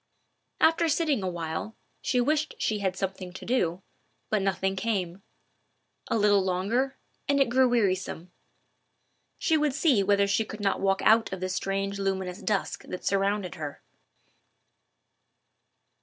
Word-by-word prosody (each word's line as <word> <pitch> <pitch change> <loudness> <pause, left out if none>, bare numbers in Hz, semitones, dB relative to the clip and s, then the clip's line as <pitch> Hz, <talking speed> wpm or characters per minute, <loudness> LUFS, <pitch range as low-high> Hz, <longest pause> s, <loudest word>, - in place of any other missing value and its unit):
After 330 +1 +4
sitting 300 -6 +1
a 185 - -1
while, 170 +5 -4 0.3
she 250 - +1
wished 305 +5 +1
she 215 -1 -1
had 190 -2 -1
something 190 -1 -4
to - - -9
do, 185 -7 0 0.5
but 215 -2 +2
nothing 195 0 0
came. 190 -3 -2 0.9
A - - +1
little 205 -2 +4
longer, 220 +9 0 0.3
and 280 0 +3
it 275 - +3
grew 260 0 +4
wearisome. 190 -6 0 1.1
She 320 -5 +2
would 295 -3 +1
see 285 -8 +3
whether 200 0 +3
she 200 +3 +1
could 215 0 -9
not 200 -1 0
walk 195 0 +1
out 225 +1 +4
of 190 - -4
the 185 0 -3
strange 195 +1 -2
luminous 190 -2 -2
dusk 210 -2 -2
that 180 - -7
surrounded 195 -1 0
her. 145 -2 -7
200 Hz, 140 wpm, -27 LUFS, 190-240 Hz, 1.1 s, After